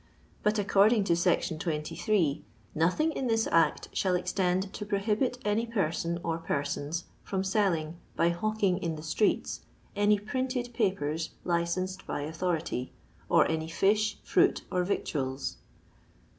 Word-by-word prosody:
But 210 Hz, +1 st, +2 dB
according 205 Hz, +2 st, +4 dB
to 175 Hz, -, +2 dB
s. 175 Hz, +1 st, +2 dB
23, 165 Hz, +1 st, 0 dB, 0.2 s
" -, -, -31 dB
nothing 180 Hz, -, +2 dB
in 270 Hz, -4 st, -2 dB
this 225 Hz, -1 st, +2 dB
Act 165 Hz, -2 st, +3 dB
shall 185 Hz, -2 st, +1 dB
extend 180 Hz, +1 st, 0 dB
to 210 Hz, -, -5 dB
prohibit 210 Hz, +5 st, 0 dB
any 215 Hz, +3 st, +1 dB
person 170 Hz, -5 st, -1 dB
or 165 Hz, 0 st, -1 dB
persons 145 Hz, +1 st, -2 dB, 0.2 s
from 190 Hz, -1 st, -2 dB
selling 180 Hz, -5 st, 0 dB, 0.2 s
(by 170 Hz, -, +3 dB
hawking 195 Hz, +1 st, 0 dB
in 170 Hz, -4 st, -2 dB
the 155 Hz, -, -8 dB
streets) 185 Hz, +7 st, 0 dB, 0.3 s
any 205 Hz, +1 st, +4 dB
printed 245 Hz, +3 st, -2 dB
papers 165 Hz, -, 0 dB
licensed 185 Hz, +2 st, -1 dB
by -, -, -2 dB
authority; 160 Hz, -4 st, -2 dB, 0.4 s
or -, -, +5 dB
any 160 Hz, 0 st, -1 dB
fish, 210 Hz, +5 st, +2 dB
fruit, -, -, +3 dB
or 180 Hz, 0 st, +1 dB
victuals." 135 Hz, -7 st, -2 dB
185 Hz, 135 wpm, -29 LUFS, 165-210 Hz, 0.4 s, or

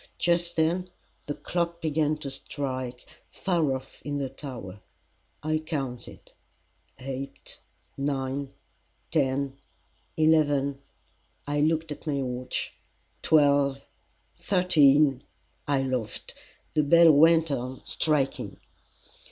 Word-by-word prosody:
Just 170 Hz, 0 st, +2 dB
then 170 Hz, +3 st, +1 dB, 0.4 s
the 145 Hz, -, -2 dB
clock 170 Hz, -1 st, -2 dB
began 155 Hz, -1 st, +1 dB
to 145 Hz, -3 st, -6 dB
strike 130 Hz, -3 st, -5 dB, 0.2 s
far 165 Hz, -8 st, 0 dB
off 130 Hz, 0 st, -10 dB
in 145 Hz, 0 st, -3 dB
the 135 Hz, -2 st, -2 dB
tower. 120 Hz, -8 st, -8 dB, 0.6 s
I 155 Hz, 0 st, +1 dB
counted 135 Hz, -6 st, -5 dB, 0.6 s
eight 135 Hz, +1 st, -7 dB, 0.4 s
nine 140 Hz, -1 st, -2 dB, 0.6 s
ten 140 Hz, -2 st, 0 dB, 0.6 s
eleven 145 Hz, -3 st, +3 dB, 0.6 s
I 145 Hz, 0 st, 0 dB
looked 160 Hz, +1 st, +1 dB
at 150 Hz, -, -8 dB
my 140 Hz, -2 st, 0 dB
watch 125 Hz, 0 st, -3 dB, 0.5 s
twelve 140 Hz, -3 st, +3 dB, 0.5 s
thirteen 150 Hz, -7 st, +4 dB, 0.5 s
I 140 Hz, -2 st, +2 dB
laughed. 125 Hz, -5 st, -3 dB, 0.4 s
The 155 Hz, -, +3 dB
bell 165 Hz, +3 st, +7 dB
went 160 Hz, +1 st, +5 dB
on 130 Hz, -1 st, -4 dB
striking. 150 Hz, -4 st, 0 dB
145 Hz, 100 wpm, -27 LUFS, 135-155 Hz, 0.6 s, bell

